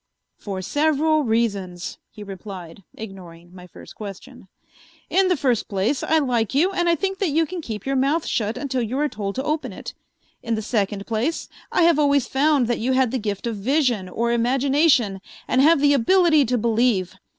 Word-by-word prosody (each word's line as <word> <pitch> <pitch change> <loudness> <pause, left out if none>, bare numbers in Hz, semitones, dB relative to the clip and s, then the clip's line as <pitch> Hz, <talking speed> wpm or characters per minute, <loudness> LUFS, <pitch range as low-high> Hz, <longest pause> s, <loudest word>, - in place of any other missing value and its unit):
"For 190 -2 -5
several 310 - +1
reasons," 200 -7 -2
he 210 - -11
replied, 190 -3 -9
ignoring 180 -5 -11
my 180 -1 -12
first - - -13
question. 210 +3 -10 0.6
"In 385 0 +3
the 365 -2 +2
first 250 -6 0
place, 200 +8 0
I 320 - +2
like 250 -5 0
you 345 +7 +3
and 350 -2 0
I 340 - +4
think 385 +4 -3
that 390 - +1
you 320 +3 +2
can 350 +2 -6
keep 220 -8 -7
your 270 0 -1
mouth 280 +5 +1
shut 215 -1 -1
until 265 -3 -2
you 240 +3 -3
are 300 +1 +1
told 200 -6 -5
to 265 - -2
open 305 +1 -2
it. - - -8 0.5
In 230 -1 -2
the 220 - -4
second 205 -3 -1
place, 235 +9 -2 0.2
I - - +3
have 335 -2 +4
always 285 -3 +3
found 280 0 +2
that 240 0 -1
you 255 +4 0
had 260 -3 +2
the 260 - -1
gift 205 -1 -4
of 230 -2 -3
vision 240 -4 0
or 235 +5 -1
imagination 250 - +2 0.3
and 260 - +2
have 315 +2 +5
the 285 0 +4
ability 310 +3 +4
to 250 +1 0
believe. 225 -5 +1
245 Hz, 195 wpm, -22 LUFS, 205-295 Hz, 0.6 s, have